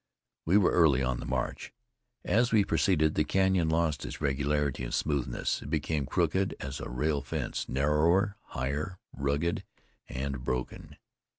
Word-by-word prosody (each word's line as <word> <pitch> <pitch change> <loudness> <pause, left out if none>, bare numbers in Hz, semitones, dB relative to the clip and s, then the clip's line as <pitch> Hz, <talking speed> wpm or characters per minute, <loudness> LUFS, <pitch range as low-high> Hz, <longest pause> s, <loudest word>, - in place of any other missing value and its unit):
We 90 +5 +4
were 100 - +4
early 75 -7 +4
on 65 -1 -1
the - - -6
march. - - -3 0.5
As 120 +3 +2
we 105 -3 +4
proceeded 80 -6 +2
the 75 - +2
canyon 95 0 +2
lost 80 -2 +1
its - - -6
regularity 70 -1 0
and - - -4
smoothness; 70 -5 -1
it - - -8
became 75 -4 -1
crooked 90 +4 +1
as 70 +1 -5
a - - -6
rail 70 +4 0
fence, 70 - -4
narrower, 80 +9 +2
higher, 70 +8 -3 0.2
rugged 70 +5 -1 0.5
and 65 -1 -4
broken. 65 -1 -4
75 Hz, 150 wpm, -29 LUFS, 70-85 Hz, 0.5 s, We